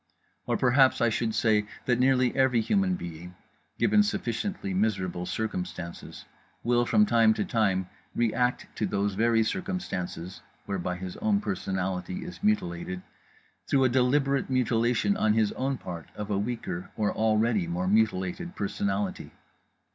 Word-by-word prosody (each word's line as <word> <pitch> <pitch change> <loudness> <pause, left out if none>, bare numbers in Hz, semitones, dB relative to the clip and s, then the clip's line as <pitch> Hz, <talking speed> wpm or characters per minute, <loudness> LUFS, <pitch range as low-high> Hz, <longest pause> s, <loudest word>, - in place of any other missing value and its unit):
Or - - +1
perhaps 130 +1 +4
I 120 - +3
should 110 0 -1
say 105 -2 +2 0.2
that 125 -1 +2
nearly 130 -1 +3
every 130 -3 +3
human 190 - +1
being, 85 - -8 0.4
given 210 +1 +4
sufficiently 190 - -2
miserable 95 -3 -1
circumstances, 90 -5 -5 0.4
will 120 0 +2
from 210 0 +5
time 115 - +4
to 105 - -1
time 95 -5 +1 0.3
react 125 +2 +1
to 105 - 0
those 100 0 0
very 115 +2 +3
circumstances 105 - -4 0.2
(whereby 90 -2 -2
his 90 0 -7
own 210 -2 +2
personality 95 - -3
is 180 - -9
mutilated) 90 - -1 0.6
through 135 -1 +3
a 130 - +4
deliberate 135 +2 +2
mutilation 125 - +2
on 110 - +3
his 110 -2 +2
own 135 +1 -2
part 85 -6 -8
of 105 0 -5
a 100 - +1
weaker 105 -5 -4
or 105 -2 +1
already 110 -3 +2
more 90 +2 -2
mutilated 110 - 0
personality. 100 0 -2
110 Hz, 140 wpm, -28 LUFS, 95-130 Hz, 0.6 s, from